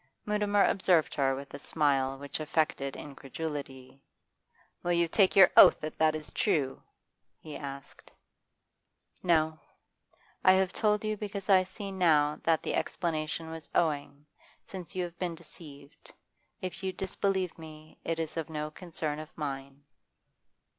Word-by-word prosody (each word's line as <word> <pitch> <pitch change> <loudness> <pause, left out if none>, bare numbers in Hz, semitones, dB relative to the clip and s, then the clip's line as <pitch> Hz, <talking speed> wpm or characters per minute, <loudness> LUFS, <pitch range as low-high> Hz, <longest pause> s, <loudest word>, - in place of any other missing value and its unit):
Mutimer 210 -1 +2
observed 180 -4 +3
her 135 -1 +1
with 140 +1 -9
a 140 - -6
smile 135 -3 +1
which 140 +2 -5
affected 155 -3 -1
incredulity. 140 -2 -7 0.8
'Will 175 - 0
you 170 0 +3
take 190 +3 +3
your 190 -2 +8
oath - - +9
that 155 0 -6
that 155 0 +4
is 155 -1 -6
true?' 135 -4 0 0.6
he 155 -2 -10
asked. 140 -1 -9 1.1
'No. 160 -2 +2 0.8
I 185 - +7
have 190 -1 +2
told 210 -1 +1
you 215 0 -1
because 200 -1 -3
I 185 -1 +7 0.3
now 155 -6 +3
see - - -19
that 165 -1 +3
the - - -2
explanation 160 -1 -2
was 160 -2 -6
owing, 145 -3 0 0.4
since 185 -2 -9
you 185 - 0
have 175 -1 -8
been 175 -2 -2
deceived. 155 -2 -12 0.5
If 185 0 -5
you 190 - 0
disbelieve 190 -1 -1
me, 155 -1 -12
it 165 - -2
is 160 -2 -3
no 150 -1 -4
concern 155 -3 -4
of 155 0 -8
mine. 140 -1 -5
155 Hz, 140 wpm, -30 LUFS, 145-180 Hz, 1.1 s, oath